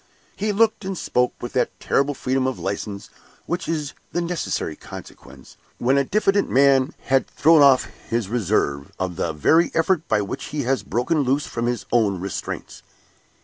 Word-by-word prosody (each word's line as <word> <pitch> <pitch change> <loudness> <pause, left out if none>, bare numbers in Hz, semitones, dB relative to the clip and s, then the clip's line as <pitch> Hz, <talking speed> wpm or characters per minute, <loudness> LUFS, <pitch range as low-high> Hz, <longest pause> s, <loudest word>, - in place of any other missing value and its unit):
He 210 +1 -1
looked 215 +1 +2
and 190 -1 -4
spoke 125 -5 0
with 120 - -5
that 125 - -1
terrible 140 +1 +1
freedom 130 0 0
of 130 - -2
license 100 +1 -5 0.3
which 175 -1 -3
is 150 -4 -2 0.2
the 175 - 0
necessary 170 - -2
consequence, - - -12 0.2
when 130 +3 +2
a 140 - +3
diffident 200 +5 +1
man 135 +1 +4
has 135 0 +2
thrown 160 0 +6
off 135 -2 +6 0.3
his 115 -3 0
reserve, 95 - 0
of 95 -2 -3
the 85 -2 -1
very 160 - +3
effort 165 0 +1
by 105 - +2
which 100 - -5
he 150 -2 -3
has 130 +1 0
broken 125 - 0
loose 140 +1 +1
from 120 0 -3
his 120 0 -2
own 105 -6 +2
restraints. 95 +1 -6
130 Hz, 170 wpm, -22 LUFS, 115-160 Hz, 0.3 s, thrown